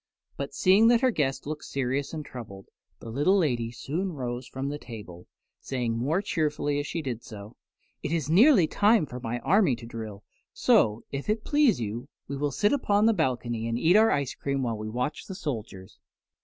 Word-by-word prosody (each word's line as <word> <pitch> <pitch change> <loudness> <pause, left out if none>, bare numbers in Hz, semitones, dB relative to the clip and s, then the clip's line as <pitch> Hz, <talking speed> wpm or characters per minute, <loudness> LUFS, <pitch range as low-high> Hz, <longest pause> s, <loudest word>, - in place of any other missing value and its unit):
But 140 0 -5
seeing 195 +8 +5
that 235 0 +5
her 260 -1 +4
guests 135 - -1
looked 150 +1 -5
serious 135 +1 -2
and 155 -2 -5
troubled, 100 -7 -10 0.3
the 115 - -8
little 145 - +3
lady 120 -10 0
soon 165 +10 -3
rose 125 -2 -4
from 130 +2 -4
the 145 +1 -4
table, 100 -9 -10 0.3
saying 125 -4 -2
more 150 - 0
cheerfully 150 -5 -1
as 145 - -3
she 165 - -3
did 120 -4 -4
so, 105 -1 -10 0.5
"It - - -4
is 165 -5 -1
nearly 200 - +6
time 205 +2 +3
for 125 -2 -8
my 120 0 -3
army 185 - +3
to 115 0 -11
drill, 110 -3 -7 0.3
so, 105 +2 +3
if 140 +7 -5
it 215 0 0
please 290 - +3
you, 115 +4 -5 0.2
we 140 - -4
will 145 +1 -1
sit 205 - +1
upon 210 -6 +2
the 225 - +5
balcony 120 - -1
and 115 0 -1
eat 165 +8 +4
our 220 +1 +6
ice 140 -3 0
cream 140 -1 -2
while 115 -2 -1
we 110 0 -5
watch 125 +6 -3
the 190 - -6
soldiers." 110 - -6
140 Hz, 195 wpm, -27 LUFS, 120-175 Hz, 0.5 s, nearly